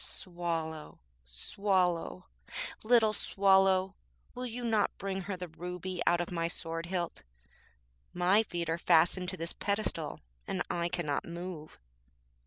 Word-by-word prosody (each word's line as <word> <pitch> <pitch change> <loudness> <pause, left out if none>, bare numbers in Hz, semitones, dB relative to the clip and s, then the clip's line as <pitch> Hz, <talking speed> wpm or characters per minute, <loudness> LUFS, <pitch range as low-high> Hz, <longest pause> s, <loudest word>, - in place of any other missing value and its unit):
Swallow, 165 -3 -4 0.3
Swallow, 175 - 0 0.6
little 220 -1 +5
Swallow, 195 -2 +4 0.4
will 250 0 -4
you 245 +1 -5
not 220 -3 +1
bring 195 -1 -3
her 190 - -2
the 180 0 -5
ruby 180 +2 -5
out 175 - +5
of 175 - -2
my 165 -1 0
sword 165 0 -4
hilt? 175 -2 -2 0.9
My 180 +4 +4
feet 175 -6 -3
are 165 +1 0
fastened 180 +2 +4
to 185 - -3
this 165 0 -2
pedestal 205 +1 -2 0.3
and - - -1
I 170 0 0
cannot 170 -5 -1
move.' 170 -2 -7
180 Hz, 130 wpm, -32 LUFS, 170-195 Hz, 0.9 s, little